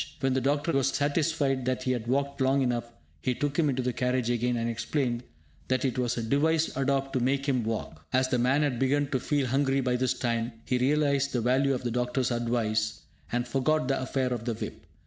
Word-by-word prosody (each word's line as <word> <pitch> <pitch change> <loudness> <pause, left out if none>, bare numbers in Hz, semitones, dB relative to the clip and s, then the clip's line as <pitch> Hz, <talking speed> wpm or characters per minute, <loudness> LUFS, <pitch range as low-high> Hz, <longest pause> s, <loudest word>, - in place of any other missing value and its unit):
When 135 -1 +1
the 130 - +1
doctor 145 +5 +1
was 135 -2 +2
satisfied 145 -2 0
that 130 0 -1
he 130 - 0
had 120 -2 -2
walked 140 +2 0
long 135 +1 +3
enough, 120 -2 -1 0.3
he 125 - 0
took 145 +3 -1
him 155 -3 +3
into 130 -1 -1
the 125 0 -1
carriage 125 -1 0
again, 120 0 0
and 115 0 -1
explained 120 +1 -1 0.5
that 130 +1 +1
it 130 -1 -1
was 120 -1 0
a 115 - -1
device 155 +7 +1
adopted 135 0 0
to - - -1
make 135 +2 0
him 130 -4 +1
walk. 110 -8 -4
As 130 0 +3
the 125 -1 0
man 130 +5 +3
had 130 -5 0
begun 145 +2 +2
to 130 - +1
feel 145 +1 0
hungry 135 +2 +1
by 125 -1 +1
this 130 0 +1
time, 115 -1 -1
he 125 - 0
realised 140 +1 +2
the 125 - +1
value 130 +3 +2
of 125 - -5
the 120 - -1
doctor's 125 +1 0
advice, 110 -2 0 0.3
and 120 0 -1
forgot 140 +2 +1
the 135 - +1
affair 130 -1 -1
of 115 -2 -5
the 120 -2 -1
whip. - - -7
130 Hz, 225 wpm, -28 LUFS, 120-140 Hz, 0.5 s, long